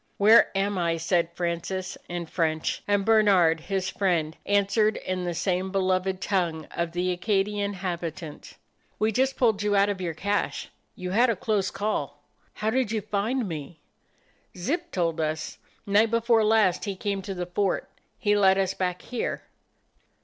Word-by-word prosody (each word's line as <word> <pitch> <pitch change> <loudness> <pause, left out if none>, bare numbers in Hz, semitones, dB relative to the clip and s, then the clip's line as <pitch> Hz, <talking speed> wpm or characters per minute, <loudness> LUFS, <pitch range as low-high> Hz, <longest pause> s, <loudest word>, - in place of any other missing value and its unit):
"Where 215 +3 +7
am 200 0 0
I?" 170 -1 +1
said 170 +1 +1
Francis, 180 +2 -3
in 175 -1 -3
French, 160 -1 -1
and 205 -1 +2
Bernard, 195 -7 +4
his 190 +2 -2
friend, 170 -5 0
answered 205 +2 +2
in 185 -1 -3
the 175 -1 -2
same 185 +2 -1
beloved 185 -1 0
tongue 175 -5 -1
of 170 -1 -3
the 180 +1 0
Acadian 200 +2 0
habitant. 170 -4 -6 0.4
"We 215 +1 +1
just 265 +4 +1
pulled 220 -5 +2
you 205 0 +1
out 200 +1 +4
of 195 -2 -3
your 170 -3 -3
cache. 200 +5 -2 0.3
You 180 0 -5
had 235 +5 +4
a 230 - +2
close 205 0 0
call." 145 -9 -3 0.3
"How 215 +1 -1
did 250 -3 0
you 220 -2 -1
find 215 +4 -1
me?" 155 -1 -7 0.8
"Zip 295 - -2
told 165 -3 -1
us. 155 0 -3 0.3
Night 210 +3 +4
before 230 0 +3
last 215 -4 +3
he 200 -2 -3
came 200 +1 -2
to 195 0 -6
the 180 0 -3
fort. 190 +3 -1 0.3
He 205 -3 +2
led 190 -2 +5
us 190 -1 +1
back 180 -1 -2
here." 245 - -3
190 Hz, 165 wpm, -26 LUFS, 175-210 Hz, 0.8 s, Where